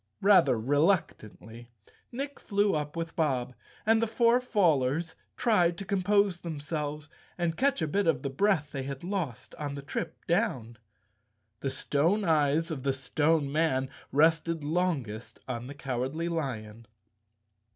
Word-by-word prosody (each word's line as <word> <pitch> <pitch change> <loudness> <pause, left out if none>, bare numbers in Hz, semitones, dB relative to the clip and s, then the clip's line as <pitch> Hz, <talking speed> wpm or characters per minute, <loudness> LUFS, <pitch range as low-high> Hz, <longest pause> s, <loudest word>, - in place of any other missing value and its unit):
Rather 190 -9 +6
reluc¬ 145 - +2
tantly, 110 +2 -13 0.4
Nick 275 +3 -5
flew 205 -1 +1
up 150 0 -2
with 165 0 -4
Bob, 130 -7 0 0.3
and 225 +1 +4
the 230 - +1
four 235 +2 +3
fallers 165 - +1 0.2
tried 175 -8 +3
to 195 - -6
compose 200 -1 +2
themselves 150 -2 -4 0.3
and 170 -2 0
catch 270 -6 +1
a - - 0
bit 195 +5 0
of 165 - +2
the 140 - -1
breath 160 -1 +1
they 135 - -4
had 135 +2 -6
lost 175 - -4
on 145 -2 -3
the 140 - -6
trip 140 - -5
down. 135 - -1 0.8
The 135 - -2
stone 165 +10 +1
eyes 160 -1 +2
of 145 -4 -4
the 135 0 0
Stone 145 +3 +1
Man 135 -4 +1 0.2
rested 160 +2 +2
longest 140 -10 -2
on 125 -1 -4
the 140 - -8
Cowardly 135 +5 -3
Lion. 115 -9 -4
155 Hz, 145 wpm, -29 LUFS, 135-180 Hz, 0.8 s, Rather